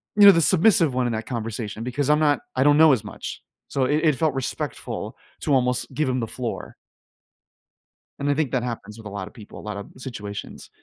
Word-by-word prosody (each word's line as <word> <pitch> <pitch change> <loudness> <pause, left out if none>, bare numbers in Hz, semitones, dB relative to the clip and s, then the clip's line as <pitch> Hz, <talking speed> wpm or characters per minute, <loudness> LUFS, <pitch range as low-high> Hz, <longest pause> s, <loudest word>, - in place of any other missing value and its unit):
you 205 -1 +7
know, 200 - +12
the 165 -3 +3
submissive 170 - +4
one 125 -1 +1
in 120 - -1
that 110 0 -3
conversation, 115 -2 -4
because 130 +3 -1
I'm 150 0 +5
not 150 -2 +3 0.2
I - - +3
don't 145 +1 +5
know 155 -2 +7
as 115 - 0
much, - - -7 0.2
so 135 - 0
it 150 +4 +1
it 155 -3 +4
felt 155 +1 +1
respectful 135 -1 -4 0.2
to, 145 - +1
almost, 125 0 +1
give 150 +2 0
him 130 0 0
the 115 - -2
floor. 120 +1 -5 1.4
And 140 0 -1
I - - +4
think 145 -2 -1
that 130 -3 0
happens 115 -3 -5
with 110 -2 -9
a - - -6
lot 100 -2 -5
of - - -13
people, 105 -3 -11
a - - -9
lot 105 -1 -5
of 100 - -7
situations. 110 -6 -7
130 Hz, 225 wpm, -24 LUFS, 115-145 Hz, 1.4 s, know